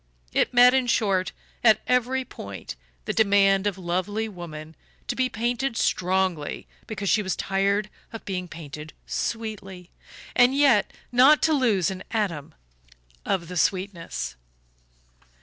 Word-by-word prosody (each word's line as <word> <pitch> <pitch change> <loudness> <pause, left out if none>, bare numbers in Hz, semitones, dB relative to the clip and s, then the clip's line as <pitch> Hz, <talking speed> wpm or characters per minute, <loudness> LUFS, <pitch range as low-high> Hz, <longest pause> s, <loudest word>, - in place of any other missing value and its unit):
It - - +2
met, 245 +1 +7
in 260 -2 +2
short, 195 -5 +1 0.3
at 220 -3 +6
every 250 +1 +1
point 100 - -8 0.3
the - - -2
demand 200 -2 +4
of 200 -2 -2
lovely 185 +5 -2
woman 160 -5 -9 0.3
to - - -2
be 255 -1 +1
painted 240 +2 -2
"strongly" 185 -4 0 0.2
because 205 -2 -4
she 215 - +3
was 190 -2 -2
tired 200 +2 0 0.2
of 225 - -9
being 180 -2 -3
painted 155 -2 -9
"sweetly" 195 -5 -5 0.4
and 250 +2 +5
yet 265 -8 +4 0.2
not 265 +5 +6
to 320 - +4
lose 215 - +2
an 190 -1 -7
atom 190 -10 -2 0.7
of 170 -3 0
the 180 +1 -6
sweetness. 170 - -2
200 Hz, 130 wpm, -25 LUFS, 180-230 Hz, 0.7 s, met